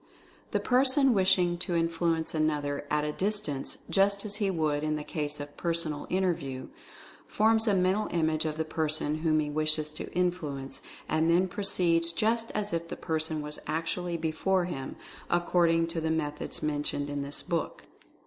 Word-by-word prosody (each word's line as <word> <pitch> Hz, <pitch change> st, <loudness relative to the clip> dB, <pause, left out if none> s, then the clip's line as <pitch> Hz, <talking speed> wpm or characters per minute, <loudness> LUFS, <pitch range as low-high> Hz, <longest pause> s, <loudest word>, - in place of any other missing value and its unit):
The -, -, 0 dB
person 260 Hz, +1 st, +4 dB
wishing 185 Hz, -3 st, +3 dB
to 175 Hz, -1 st, -1 dB
influence 165 Hz, -1 st, 0 dB
another 150 Hz, -2 st, 0 dB
at 150 Hz, 0 st, +1 dB
a 150 Hz, -, -1 dB
dis 205 Hz, +6 st, 0 dB
tance, 145 Hz, -9 st, -4 dB
just 200 Hz, +1 st, +2 dB
as 205 Hz, 0 st, -3 dB
he 205 Hz, -3 st, +1 dB
would 155 Hz, -4 st, 0 dB
in 155 Hz, 0 st, 0 dB
the 150 Hz, -, -4 dB
case 150 Hz, -2 st, -3 dB
of 145 Hz, 0 st, -5 dB
a -, -, -23 dB
Personal 165 Hz, -2 st, -1 dB
Inter 185 Hz, -1 st, +1 dB
view, 135 Hz, -4 st, -7 dB, 0.6 s
forms 220 Hz, +1 st, +3 dB
a 205 Hz, -, +4 dB
Mental 190 Hz, +3 st, +2 dB
Image 160 Hz, -2 st, +1 dB
of 155 Hz, -1 st, -2 dB
the 160 Hz, -, -1 dB
person 155 Hz, -1 st, 0 dB
whom 155 Hz, -1 st, +2 dB
he 150 Hz, -1 st, -1 dB
wishes 155 Hz, 0 st, +2 dB
to 155 Hz, -, -7 dB
influence, 155 Hz, -7 st, -2 dB, 0.3 s
and 160 Hz, +1 st, +2 dB
then 175 Hz, +3 st, +4 dB
proceeds 170 Hz, -3 st, +2 dB
just 225 Hz, +5 st, +1 dB
as 210 Hz, -3 st, -2 dB
if 165 Hz, 0 st, -2 dB
the -, -, -6 dB
person 160 Hz, -1 st, -1 dB
was 150 Hz, 0 st, -6 dB
actually 170 Hz, +2 st, -2 dB
before 165 Hz, +3 st, +1 dB
him, 135 Hz, -7 st, -5 dB, 0.3 s
according 175 Hz, -1 st, +3 dB
to 165 Hz, -1 st, -2 dB
the 160 Hz, -, -1 dB
methods 150 Hz, -2 st, -2 dB
mentioned 145 Hz, -1 st, -1 dB
in 145 Hz, 0 st, -3 dB
this 140 Hz, +1 st, -2 dB
book. 170 Hz, -2 st, -2 dB
165 Hz, 175 wpm, -29 LUFS, 150-185 Hz, 0.6 s, person